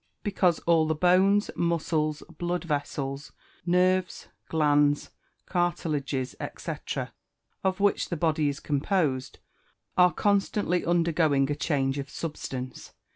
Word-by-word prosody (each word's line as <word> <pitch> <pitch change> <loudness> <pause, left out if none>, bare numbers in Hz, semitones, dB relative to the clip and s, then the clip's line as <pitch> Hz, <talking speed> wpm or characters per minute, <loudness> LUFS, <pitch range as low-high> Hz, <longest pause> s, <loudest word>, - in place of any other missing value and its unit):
_ - - -48
Because 185 -5 +2
all 165 -2 +3
the 160 - +1
bones, 190 +5 +3
muscles, 160 -3 0 0.2
blood 175 0 -1
vessels, 145 -2 -3 0.3
nerves, 180 +1 +1 0.2
glands, 145 -2 +2 0.3
cartilages, 150 -7 -1 0.2
&c., - - -4 0.9
of 190 0 0
which 205 0 +2
the 170 - -2
body 155 -2 +1
is 140 +1 -4
composed, 145 -3 -1 0.6
are 180 -1 +6
constantly 200 -3 +1
undergoing 160 -5 +2
a - - 0
change 140 -3 0
of 140 0 -5
substance. 130 -5 -6
160 Hz, 115 wpm, -27 LUFS, 145-180 Hz, 0.9 s, are